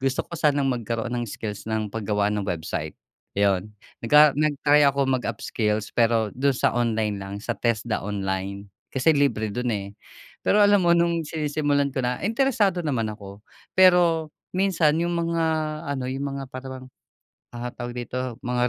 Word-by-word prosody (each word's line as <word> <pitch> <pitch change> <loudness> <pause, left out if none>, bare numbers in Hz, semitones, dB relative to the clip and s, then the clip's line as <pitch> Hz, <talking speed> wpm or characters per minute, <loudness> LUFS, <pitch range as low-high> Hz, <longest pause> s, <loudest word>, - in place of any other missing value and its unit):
gusto 135 0 0
ko - - -21
sanang 145 -3 +2
magkaroon 120 -1 -2
ng 120 -1 -2
skills 105 0 -6
ng 110 -1 -1
pag-gawa 105 -2 0
ng 105 -1 -2
website, 80 -2 -4 0.4
yun. 100 0 +1 0.3
Naga 150 +4 +7
nag-try 150 -1 +3
ako 140 0 0
mag 130 -2 0
upskills 105 -2 -2
pero 115 -2 +2
dun 135 0 +1
sa - - +2
online 110 -3 0
lang 95 0 -6
sa 120 - -2
TESDA 115 -1 -1
online 100 0 -3 0.2
kasi 135 +4 +3
libre 135 -6 +1
dun 125 +2 -1
eh. 100 -1 -4 0.5
Pero 210 - +4
alam 205 0 +5
mo 170 - +5
nung 170 -1 +1
sinisimulan 145 -2 0
ko 130 - -1
na 125 0 -1
interesado 220 -5 +2
naman 125 -7 0
ako 100 -1 -11 0.4
pero 175 -4 +5 0.2
minsan 180 -5 +2
yung 175 +1 0
mga 170 -1 0 0.5
ano, 130 - -4
yung 135 +2 -3
mga 135 - -5
para 130 +1 -7
bang, 130 0 -9 0.7
ah, 120 +1 -4
tawag 120 -1 -6
dito, 125 0 -4
mga 125 0 +1
125 Hz, 165 wpm, -24 LUFS, 110-150 Hz, 0.7 s, Naga